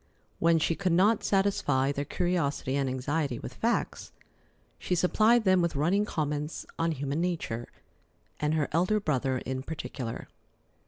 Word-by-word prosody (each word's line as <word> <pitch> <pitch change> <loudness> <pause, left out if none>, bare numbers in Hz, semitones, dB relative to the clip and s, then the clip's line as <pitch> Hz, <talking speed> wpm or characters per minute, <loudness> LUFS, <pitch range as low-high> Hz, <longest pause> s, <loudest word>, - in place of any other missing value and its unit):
When 165 0 +4
she 160 +1 +1
could 185 0 0
not 200 +5 +4
satisfy 145 -9 +2
their 145 0 -3
curiosity 145 -7 -1
and 140 -2 0
anxiety 135 +1 -1
with 125 - -7
facts, 235 - -1 0.7
she 180 - -1
supplied 215 +7 +4
them 185 -2 +4
with 170 -3 0
running 180 +9 +2
comments 150 -3 -3
on 165 0 +1
human 145 +2 -2
nature 160 -10 -2 0.7
and 150 +1 +1
her 150 -2 +1
elder 185 +7 +2
brother 135 -7 0
in 130 0 -3
particular. 130 -5 -6
160 Hz, 145 wpm, -29 LUFS, 140-180 Hz, 0.7 s, When